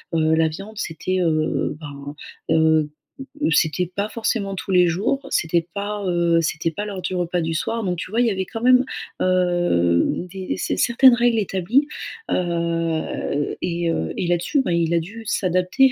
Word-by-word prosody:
heu -, -, +3 dB
heu, 160 Hz, 0 st, +3 dB
la 160 Hz, 0 st, +3 dB
viande, 195 Hz, +7 st, -8 dB
c'était, 185 Hz, +1 st, -2 dB
heu, 155 Hz, -2 st, 0 dB
ben, 145 Hz, -1 st, -8 dB, 0.4 s
heu, 160 Hz, -1 st, +3 dB, 0.6 s
c'était 155 Hz, +2 st, +2 dB
pas 200 Hz, +2 st, -1 dB
forcément 215 Hz, -3 st, -2 dB
tous 190 Hz, -, -5 dB
les 180 Hz, -1 st, +5 dB
jours, 205 Hz, +11 st, -1 dB
c'était 165 Hz, 0 st, +1 dB
pas, 205 Hz, 0 st, -3 dB
heu, 170 Hz, -1 st, +2 dB
c'était 165 Hz, +1 st, -1 dB
pas 205 Hz, -, -4 dB
l'heure 200 Hz, -3 st, -5 dB
du -, -, -2 dB
repas 175 Hz, -1 st, -1 dB
du 165 Hz, 0 st, -2 dB
soir. 225 Hz, +8 st, -2 dB
Donc, 180 Hz, -3 st, -1 dB
tu 185 Hz, -, -5 dB
vois, 230 Hz, +4 st, +1 dB
il -, -, +3 dB
y 225 Hz, -, +2 dB
avait 190 Hz, -1 st, -2 dB
quand 225 Hz, -, -6 dB
même, 255 Hz, +1 st, +5 dB, 0.4 s
heu, 175 Hz, -, +2 dB
des 190 Hz, -1 st, -4 dB
s -, -, -2 dB
certaines 250 Hz, +2 st, +6 dB
règles 240 Hz, -1 st, +3 dB
établies. 210 Hz, -, +1 dB, 0.4 s
Heu 165 Hz, -4 st, -1 dB
et 170 Hz, -1 st, -1 dB
heu 80 Hz, -, -2 dB
et -, -, -1 dB
là-dessus, 175 Hz, -, +1 dB
ben, 180 Hz, -, -2 dB
il 170 Hz, 0 st, +1 dB
a -, -, +4 dB
dû 205 Hz, +8 st, -8 dB
s'adapter 185 Hz, +8 st, +2 dB
175 Hz, 180 wpm, -22 LUFS, 165-205 Hz, 0.6 s, certaines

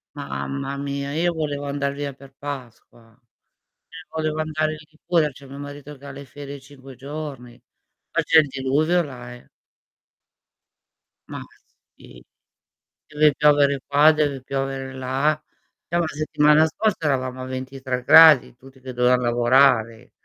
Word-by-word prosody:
Mamma 140 Hz, -1 st, -5 dB
mia, 140 Hz, 0 st, -4 dB
io 170 Hz, +2 st, +1 dB
volevo 145 Hz, -3 st, -3 dB
andar 140 Hz, 0 st, -2 dB
via 140 Hz, -1 st, -4 dB
per 135 Hz, 0 st, -17 dB
Pasqua, 120 Hz, -4 st, -10 dB, 1.0 s
volevo 155 Hz, -1 st, -2 dB
andare 155 Hz, 0 st, -1 dB
in 155 Hz, -, -8 dB
Liguria, 155 Hz, -1 st, 0 dB
c'è 135 Hz, +1 st, -15 dB
mio 140 Hz, -, -10 dB
marito 145 Hz, 0 st, -9 dB
che 140 Hz, -, -16 dB
ha 140 Hz, -, -7 dB
le 140 Hz, +1 st, -10 dB
ferie 140 Hz, +1 st, -10 dB
5 135 Hz, -1 st, -14 dB
giorni, 135 Hz, -3 st, -8 dB, 0.5 s
ma -, -, +1 dB
c'è 160 Hz, -, +6 dB
il 155 Hz, -, +2 dB
diluvio 145 Hz, +7 st, +1 dB
là, 125 Hz, -3 st, -9 dB
eh. 125 Hz, -, -16 dB, 1.8 s
Ma -, -, -7 dB, 0.6 s
sì. -, -, -15 dB, 0.8 s
Deve 150 Hz, -1 st, +3 dB
piovere 145 Hz, -2 st, +3 dB
qua, 145 Hz, +2 st, +5 dB
deve 145 Hz, -3 st, -1 dB
piovere 135 Hz, 0 st, -4 dB
là. 135 Hz, +4 st, -1 dB, 0.5 s
Già, 170 Hz, +1 st, 0 dB
settimana 150 Hz, 0 st, +3 dB
scorsa 190 Hz, +2 st, -2 dB
eravamo 130 Hz, -2 st, -1 dB
a -, -, -5 dB
23°, 130 Hz, +2 st, +4 dB
tutti 130 Hz, +1 st, -17 dB
che 130 Hz, 0 st, -8 dB
dovevan 125 Hz, +1 st, +3 dB
lavorare. 120 Hz, -1 st, +2 dB
140 Hz, 135 wpm, -22 LUFS, 130-150 Hz, 1.8 s, c'è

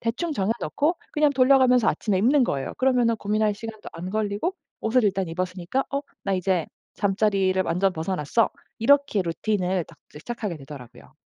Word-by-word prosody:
대충 250 Hz, +9 st, -2 dB
정해 205 Hz, -3 st, 0 dB
놓고 320 Hz, +4 st, 0 dB, 0.2 s
그냥 300 Hz, -1 st, +3 dB
돌려가면서 255 Hz, -2 st, +5 dB
아침에 200 Hz, -4 st, 0 dB
입는 255 Hz, +7 st, +4 dB
거예요. 135 Hz, -, -3 dB
그러면은 250 Hz, -3 st, +3 dB
고민할 210 Hz, 0 st, 0 dB
시간도 220 Hz, 0 st, -8 dB
안 175 Hz, +3 st, -6 dB
걸리고 215 Hz, -, -1 dB, 0.3 s
옷을 235 Hz, +2 st, +2 dB
일단 195 Hz, -2 st, +1 dB
입었으니까 180 Hz, +7 st, -2 dB
'어? 280 Hz, -, 0 dB, 0.2 s
나 195 Hz, -, -1 dB
이제 185 Hz, -2 st, 0 dB, 0.3 s
잠자리를 195 Hz, -2 st, +1 dB
완전 185 Hz, +3 st, +1 dB
벗어났어.' 165 Hz, +5 st, 0 dB, 0.3 s
이렇게 275 Hz, -3 st, +3 dB
루틴을 180 Hz, +1 st, -1 dB
딱 -, -, -18 dB
이제 -, -, -11 dB
시작하게 210 Hz, -5 st, -4 dB
되더라고요. 135 Hz, -3 st, -12 dB
210 Hz, 405 characters per minute, -24 LUFS, 185-245 Hz, 0.3 s, 돌려가면서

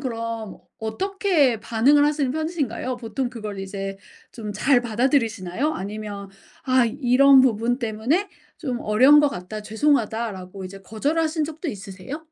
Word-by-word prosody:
그럼 230 Hz, -4 st, -5 dB, 0.2 s
어떻게 320 Hz, -, +1 dB
반응을 270 Hz, +7 st, +3 dB
하시는 295 Hz, -3 st, +1 dB
편이신가요? 295 Hz, -6 st, -2 dB
보통 240 Hz, +2 st, -3 dB
그걸 210 Hz, -4 st, -6 dB
이제 195 Hz, 0 st, -5 dB, 0.4 s
좀 215 Hz, -4 st, -6 dB
잘 245 Hz, +5 st, +3 dB
받아들이시나요? 235 Hz, -, 0 dB
아니면 205 Hz, 0 st, -6 dB, 0.4 s
'아 255 Hz, -3 st, +3 dB
이런 265 Hz, +3 st, +5 dB
부분 245 Hz, 0 st, +2 dB
때문에 240 Hz, -, 0 dB, 0.3 s
좀 255 Hz, -7 st, -3 dB
어려운 260 Hz, +8 st, +6 dB
것 295 Hz, -, +3 dB
같다 195 Hz, +1 st, -7 dB
죄송하다.'라고 220 Hz, -6 st, -1 dB
이제 195 Hz, +1 st, -9 dB
거절하신 305 Hz, -, -1 dB
적도 320 Hz, +2 st, -6 dB
있으세요? 200 Hz, -, -7 dB
235 Hz, 325 characters per minute, -23 LUFS, 210-285 Hz, 0.4 s, 어려운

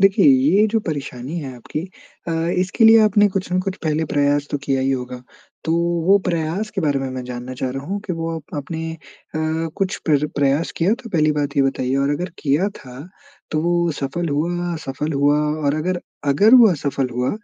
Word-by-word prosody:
देखिए 195 Hz, 0 st, +5 dB
ये 260 Hz, -6 st, +5 dB
जो 225 Hz, +1 st, +1 dB
परेशानी 140 Hz, 0 st, -4 dB
है 135 Hz, -5 st, -6 dB
आपकी 120 Hz, +5 st, -5 dB, 0.5 s
अ, -, -, -1 dB, 0.3 s
इसके 185 Hz, +5 st, +1 dB
लिए 225 Hz, 0 st, +8 dB
आपने 205 Hz, 0 st, +4 dB
कुछ 185 Hz, -2 st, -3 dB
न 180 Hz, -, +2 dB
कुछ 190 Hz, 0 st, -4 dB
पहले 155 Hz, 0 st, 0 dB
प्रयास 145 Hz, 0 st, +1 dB
तो 145 Hz, -, -1 dB
किया 135 Hz, -1 st, 0 dB
ही 135 Hz, +1 st, +1 dB
होगा। 125 Hz, -1 st, -4 dB, 0.4 s
तो 160 Hz, -, 0 dB, 0.3 s
वो 200 Hz, +1 st, +6 dB
प्रयास 170 Hz, +5 st, -1 dB
के 195 Hz, -, -1 dB
बारे 145 Hz, -4 st, +1 dB
में, 135 Hz, 0 st, -3 dB
मैं 130 Hz, 0 st, -5 dB
जानना 125 Hz, 0 st, -6 dB
चाह 130 Hz, 0 st, -3 dB
रहा 135 Hz, +1 st, -5 dB
हूँ 200 Hz, +3 st, -2 dB
कि 185 Hz, -, -2 dB
वो 165 Hz, 0 st, -3 dB
आप 155 Hz, -1 st, -9 dB
अपने 160 Hz, +3 st, -4 dB
अ, -, -, -14 dB, 0.8 s
कुछ 195 Hz, -1 st, -1 dB
प्र 150 Hz, -1 st, +3 dB
प्रयास 145 Hz, +3 st, +1 dB
किया 185 Hz, +6 st, +2 dB
तो 230 Hz, -, -9 dB
पहली 155 Hz, -4 st, +2 dB
बात 145 Hz, -1 st, -2 dB
ये 140 Hz, -, +5 dB
बताइए 135 Hz, -1 st, 0 dB
और 140 Hz, +1 st, +1 dB
अगर 175 Hz, +5 st, -2 dB
किया 150 Hz, +7 st, +1 dB
था 125 Hz, 0 st, -11 dB, 0.5 s
तो 155 Hz, -, 0 dB
वो 170 Hz, 0 st, +1 dB
सफल 145 Hz, +5 st, -3 dB
हुआ, 175 Hz, +4 st, -1 dB
असफल 150 Hz, 0 st, -4 dB
हुआ 145 Hz, +1 st, +3 dB, 0.3 s
और 140 Hz, 0 st, +2 dB
अगर 175 Hz, +3 st, -1 dB, 0.3 s
अगर 205 Hz, -, +5 dB
वो 245 Hz, -3 st, +9 dB
असफल 140 Hz, -5 st, -1 dB
हुआ, 125 Hz, +2 st, 0 dB
155 Hz, 205 wpm, -20 LUFS, 140-180 Hz, 0.8 s, वो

